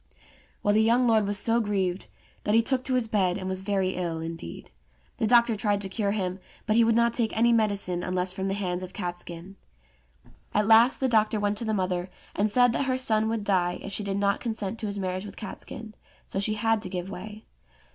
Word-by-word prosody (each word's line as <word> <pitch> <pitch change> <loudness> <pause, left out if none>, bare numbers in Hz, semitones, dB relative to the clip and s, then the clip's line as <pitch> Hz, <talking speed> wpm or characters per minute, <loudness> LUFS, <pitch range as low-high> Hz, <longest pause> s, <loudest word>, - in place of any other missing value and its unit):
Well, 205 - +3
the 215 - +4
young 235 +3 +3
lord 220 -3 +3
was 205 0 0
so 230 +2 +2
grieved, 195 -4 -1 0.4
that 210 - +1
he 230 - +5
took 255 +1 +1
to 260 - 0
his 245 -3 +1
bed 190 -5 +1
and 185 -2 -5
was 190 0 -2
very 195 -1 0
ill 170 -3 -3
indeed. 165 - -7 0.5
The 220 - 0
doctor 235 0 +5
tried 205 -1 +1
to 195 - -4
cure 200 +1 -1
him, 190 -2 -2 0.3
but 215 - +1
he 230 - +6
would 225 0 +3
not 235 0 +3
take 230 -3 0
any 235 +1 +4
medicine 200 -5 +1
unless 180 0 -1
from 190 +1 -3
the 195 - -1
hands 180 -3 -2
of 185 0 -8
Catskin. 175 0 -6 1.0
At 210 0 +3
last 230 +6 +5
the 265 - +3
doctor 215 -2 +2
went 205 0 0
to 235 - -4
the 220 -1 0
mother, 185 -1 -1 0.3
and 210 +2 +1
said 245 +2 +4
that 275 - 0
her 255 -1 0
son 220 -4 +2
would 225 -2 -2
die 180 -3 +1
if 200 - -6
she 210 - -2
did 200 -1 -2
not 200 0 +1
consent 220 -2 -4
to 215 - -3
his 200 0 -4
marriage 185 -1 -3
with 205 - -9
Catskin; 220 0 -8 0.3
so 195 - -3
she 215 +2 +2
had 225 0 +1
to - - -5
give 180 -1 -4
way. 210 +3 -8
205 Hz, 225 wpm, -27 LUFS, 185-225 Hz, 1.0 s, he